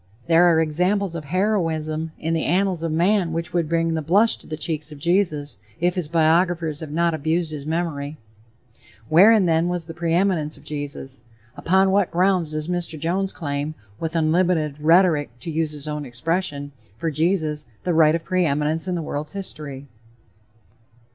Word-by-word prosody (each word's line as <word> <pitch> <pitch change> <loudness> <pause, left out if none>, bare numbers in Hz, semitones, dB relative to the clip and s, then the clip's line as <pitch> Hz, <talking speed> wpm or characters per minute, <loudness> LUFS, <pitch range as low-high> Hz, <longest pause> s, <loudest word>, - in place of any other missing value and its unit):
There 165 +4 +5
are 170 -2 +4
examples 180 +4 0
of 165 -3 -6
heroism 160 -3 -1
in 165 +1 -2
the 160 - 0
annals 185 0 +1
of 165 -1 -2
man 175 +1 +2
which 165 0 -4
would 170 -3 0
bring 165 0 +1
the 160 - -1
blush 200 +9 +4
to - - -12
the 155 - -5
cheeks 155 0 -2
of 150 - -9
Jesus, 155 - 0 0.2
if 175 +1 +2
his 180 -4 -3
biographers 165 -1 +2
have 160 - -7
not 170 +2 +1
abused 160 +2 -1
his 150 -1 -6
memory. 155 -3 -3 0.9
Wherein, 200 +5 +6
then, 165 0 +2
was 175 -2 -2
the 165 - -8
"preeminence" 170 -2 0
of - - -17
Jesus? 140 -3 -6 0.3
Upon 190 +2 +2
what 200 -1 +2
grounds 180 -1 +1
does 155 0 -4
Mr. 175 -2 -2
Jones 185 +5 -1
claim, 145 -1 -4 0.2
with 165 0 -3
"unlimited 160 -2 +1
rhetoric," 160 -5 +3
to 165 - -5
use 160 0 -1
his 150 0 -5
own 150 -1 -3
expression, 145 +3 -3 0.3
for 165 +4 -2
Jesus 155 -2 0 0.2
"the 180 - 0
right 160 -1 +5
of 165 - -3
preeminence 160 -2 0
in 180 - -1
the 170 - -3
world's 150 0 -5
history?" 150 -8 -6
165 Hz, 170 wpm, -22 LUFS, 150-175 Hz, 0.9 s, Wherein